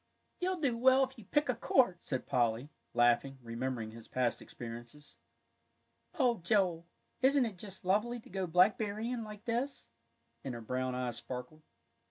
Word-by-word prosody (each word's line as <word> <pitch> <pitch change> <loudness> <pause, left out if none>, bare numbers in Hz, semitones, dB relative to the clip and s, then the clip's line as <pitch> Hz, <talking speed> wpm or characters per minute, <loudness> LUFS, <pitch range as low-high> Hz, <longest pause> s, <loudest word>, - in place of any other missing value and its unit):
"You'll 365 0 0
do 270 -6 +1
well 260 +3 +5
if 265 0 -3
you 215 - -12
pick 295 +8 +2
a 250 - +2
quart," 230 -5 +3
said 130 -3 -3
Polly, 120 +3 +1 0.2
laughing, 120 +3 +3
remembering 115 -1 -3
his 115 0 -12
past 125 -2 0
experiences. 120 +5 -9 1.0
"Oh, 245 -6 +3
Joel, 175 -2 +1 0.3
isn't 270 0 +5
it 200 -6 -5
just 195 -2 -9
lovely 215 +6 +2
to - - -16
go 190 -1 -2
blackberrying 215 +6 +2
like 210 0 -9
this!" 245 - -2 0.5
and 130 -3 -4
her 120 - -6
brown 130 +2 -2
eyes 125 -2 -2
sparkled. 125 +5 -7
180 Hz, 155 wpm, -33 LUFS, -, 1.0 s, well